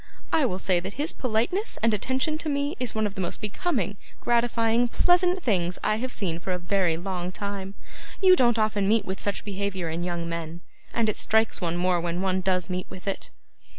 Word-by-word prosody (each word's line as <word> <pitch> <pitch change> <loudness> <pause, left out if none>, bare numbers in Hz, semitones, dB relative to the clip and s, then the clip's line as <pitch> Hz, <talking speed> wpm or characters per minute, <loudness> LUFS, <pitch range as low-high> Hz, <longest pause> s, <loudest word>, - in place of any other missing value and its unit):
I 305 -5 +4
will 185 - -2
say 185 -2 +2
that 190 +3 -6
his 300 +4 -1
politeness 255 - -1
and 230 -1 +4
attention 260 +8 0
to 315 - -3
me 285 +1 0
is 250 -3 0
one 220 0 +1
of 205 - -2
the 190 - -4
most 175 - -3
becoming, 210 - -1 0.2
gratifying, 235 0 +2
pleasant 355 +6 +3
things 180 -6 +1
I 215 - +2
have 255 +3 -3
seen 170 -8 -2
for 185 +1 -2
a - - 0
very 175 -2 +1
long 180 0 -3
time. 200 0 -4 0.4
You 375 -2 +7
don't 240 -6 +3
often 215 -2 +1
meet 220 +1 +3
with 190 0 -4
such 205 - -2
behaviour 195 -4 -2
in 165 +2 -3
young 175 -1 -2
men, 170 0 -5 0.3
and 230 -2 +1
it 215 - 0
strikes 220 -1 +2
one 170 -1 -1
more 180 -1 +2
when 170 +1 -2
one 190 0 +1
does 185 -1 +1
meet 185 -1 -3
with 185 +2 -10
it. 195 - -3
200 Hz, 210 wpm, -26 LUFS, 180-235 Hz, 0.4 s, You